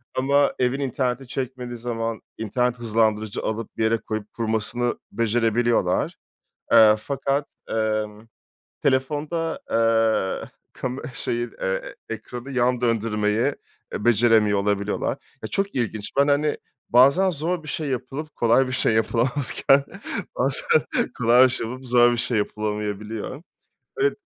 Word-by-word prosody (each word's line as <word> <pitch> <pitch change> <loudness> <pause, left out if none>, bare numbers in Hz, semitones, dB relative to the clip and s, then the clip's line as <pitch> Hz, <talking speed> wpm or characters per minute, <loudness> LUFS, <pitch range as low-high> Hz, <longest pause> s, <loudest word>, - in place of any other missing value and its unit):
ama 140 +2 +3
evin 125 +2 +1
interneti 130 -1 -2
çekmediği 125 -2 -5
zaman 115 -1 -3 0.2
internet 125 +3 -1
hızlandırıcı 110 -2 0
alıp, 110 0 -4
bir 110 - 0
yere 110 +1 +3
koyup, 110 -1 -6
kurmasını 115 +2 -1
becerebiliyorlar, 115 -3 +1 0.6
eee, 110 -1 +8
fakat, 140 +4 -2 0.2
emm, 110 0 -2 0.6
telefonda, 150 +5 0
eee, 115 -3 +1 0.2
kame 130 +1 -4
şeyi, 120 +1 -2
eee, - - -20
eee, 95 0 -2
ekranı 120 +4 -7
yan 125 -1 +1
döndürmeyi, 115 +1 +1 0.4
eee, 105 - -4
beceremiyor 110 -3 +4
olabiliyorlar. 100 0 -1 0.3
Ya 110 - -4
çok 200 0 -1
ilginç, 110 -4 -2
ben, 140 +1 +5
hani, 145 +1 +2 0.3
bazen 140 +10 +5
zor 165 +1 -2
bir - - -11
şey 150 +1 -3
yapılıp, 135 +4 -5
kolay 120 +3 +3
bir 130 - -4
şey 130 - +2
yapılamazken, 130 +4 +3 0.5
bazen - - +1 0.5
kolay 125 +1 +6
bir - - +3
şey 120 - -2
olup, 130 +2 -8
zor 120 0 +5
bir 120 - -1
şey 120 -1 0
yapılamayabiliyor. 105 +4 -3 0.6
Evet. 415 0 +1
120 Hz, 130 wpm, -23 LUFS, 110-130 Hz, 0.6 s, eee